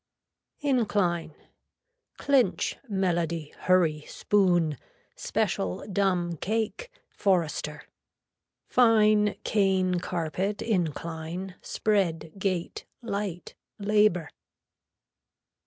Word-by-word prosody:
INCLINE. 205 - 0 0.8
Clinch, 275 -4 +2
melody, 170 -5 -1
hurry, 170 -5 +2
spoon, 175 -8 +2 0.4
special, 90 -1 -2
dumb, 180 -4 0
cake, 225 - -2 0.2
forrester. 155 -6 0 0.8
Fine, 215 -3 +4
cane, 190 -3 +2
carpet, 180 +4 -2
incline, 170 -2 -3
spread, 175 -7 0
gate, 185 -3 -2 0.2
light, 200 -5 -4 0.2
labor. 205 -5 +2
185 Hz, 65 wpm, -27 LUFS, 170-210 Hz, 0.8 s, Fine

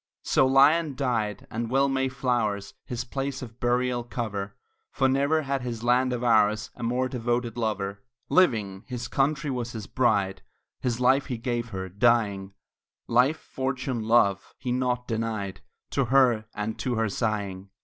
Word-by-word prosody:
So 130 - +3
Lyon 140 +3 +4
died; 115 -6 -1
and 115 +1 -3
well 135 +2 +3
may 135 -1 0
flowers 115 -7 -1
His 120 -1 -4
place 135 +1 -4
of 115 0 -11
burial 120 0 +1
cover, 110 -5 -4 0.4
For 135 - +2
never 140 +4 +2
had 135 -1 -1
this 120 -2 -4
land 125 +1 +3
of 125 -1 -2
ours 110 -2 +3
A - - -13
more 125 +2 0
devoted 120 -1 -2
lover. 105 -4 -2 0.3
Living, 105 - +2
his 125 -1 -4
country 150 +1 0
was 120 -2 -3
his 110 -3 -6
bride; 100 -7 +1 0.4
His 120 -2 -1
life 130 +2 +3
he 125 - -3
gave 120 0 -2
her, 95 -3 -5
dying; 100 -2 +1 0.5
Life, 125 +6 +3
fortune, 130 -3 -3
love, 110 -3 +2
he 125 -1 -4
nought 125 0 0
denied 110 -4 -3 0.3
To 135 - +1
her, 120 -3 +4
and 105 +1 -3
to 125 -2 -1
her 115 0 +1
sighing. 100 -3 -2
120 Hz, 160 wpm, -26 LUFS, 110-130 Hz, 0.5 s, Lyon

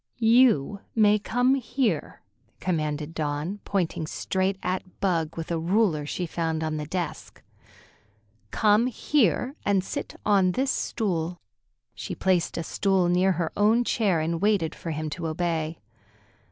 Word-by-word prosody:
"You 225 - +4 0.2
may 210 -1 +5
come 245 +5 +2
here," 250 - -1 0.4
commanded 155 -3 -2
Dawn, 155 +5 -3
pointing 170 -5 -1
straight 190 +3 -1
at 185 0 -4
Bug 165 -5 0
with 165 +1 -5
a 165 - 0
ruler 170 -4 +1
she 180 - -3
found 160 -1 -2
on 155 -1 -2
the 150 -1 -4
desk. 175 +1 -5 1.1
"Come 215 - +3
here 255 - +1
and 195 -2 +2
sit - - -5
on 195 -3 +3
this 265 +4 +1
stool." 175 -6 -2 0.6
She - - -6
placed 185 -3 +1
a 165 - -2
stool 190 +1 +1
near 185 +2 +3
her 170 -2 -2
own 220 +4 +4
chair 205 -8 +1
and 165 +2 -2
waited 200 -6 +2
for 170 - -7
him 155 0 -3
to 165 +1 -4
obey. 160 -1 -2
180 Hz, 140 wpm, -26 LUFS, 160-210 Hz, 1.1 s, may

